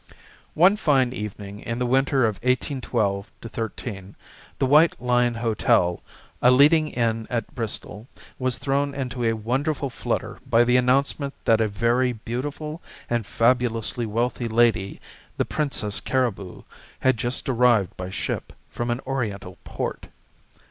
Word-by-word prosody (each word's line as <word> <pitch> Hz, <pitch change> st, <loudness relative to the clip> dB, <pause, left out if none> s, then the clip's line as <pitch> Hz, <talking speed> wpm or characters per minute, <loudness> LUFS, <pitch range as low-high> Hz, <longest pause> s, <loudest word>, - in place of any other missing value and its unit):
One 185 Hz, +6 st, +5 dB
fine 135 Hz, -, +2 dB
evening 105 Hz, -2 st, -6 dB
in 115 Hz, +2 st, -4 dB
the 125 Hz, -, 0 dB
winter 130 Hz, +1 st, +2 dB
of 110 Hz, -3 st, -1 dB
1812 120 Hz, -6 st, -1 dB
13, 110 Hz, -3 st, -6 dB, 0.4 s
the -, -, +1 dB
White 150 Hz, +5 st, +5 dB
Lion 125 Hz, -1 st, +2 dB
hotel, 110 Hz, -6 st, +1 dB, 0.4 s
a 125 Hz, -, +6 dB
leading 150 Hz, +5 st, +5 dB
inn 115 Hz, -5 st, -1 dB
at 115 Hz, +1 st, -3 dB
Bristol, 115 Hz, -2 st, -4 dB, 0.3 s
was 130 Hz, -1 st, -1 dB
thrown 140 Hz, 0 st, -1 dB
into 125 Hz, -3 st, -3 dB
a 115 Hz, -1 st, +2 dB
wonderful 135 Hz, +6 st, -1 dB
flutter -, -, -3 dB
by 120 Hz, -1 st, +5 dB
the 125 Hz, +1 st, +2 dB
announcement 135 Hz, +3 st, +1 dB
that 115 Hz, 0 st, +4 dB
a 110 Hz, -, +2 dB
very 120 Hz, +4 st, +1 dB
beautiful 145 Hz, +8 st, -5 dB, 0.3 s
and 120 Hz, -3 st, 0 dB
fabulously 120 Hz, -1 st, +1 dB
wealthy 120 Hz, +2 st, -1 dB
lady, 115 Hz, -4 st, +2 dB, 0.4 s
the -, -, +1 dB
Princess 135 Hz, -9 st, -1 dB
Cariboo, 115 Hz, -8 st, -2 dB, 0.4 s
had 130 Hz, -1 st, +3 dB
just 120 Hz, +2 st, -2 dB
arrived 120 Hz, -6 st, +3 dB
by 90 Hz, 0 st, -6 dB
ship -, -, -4 dB, 0.2 s
from 120 Hz, 0 st, -3 dB
an 120 Hz, +2 st, -1 dB
oriental 105 Hz, -9 st, -4 dB
port. -, -, -5 dB
120 Hz, 135 wpm, -24 LUFS, 110-130 Hz, 0.4 s, a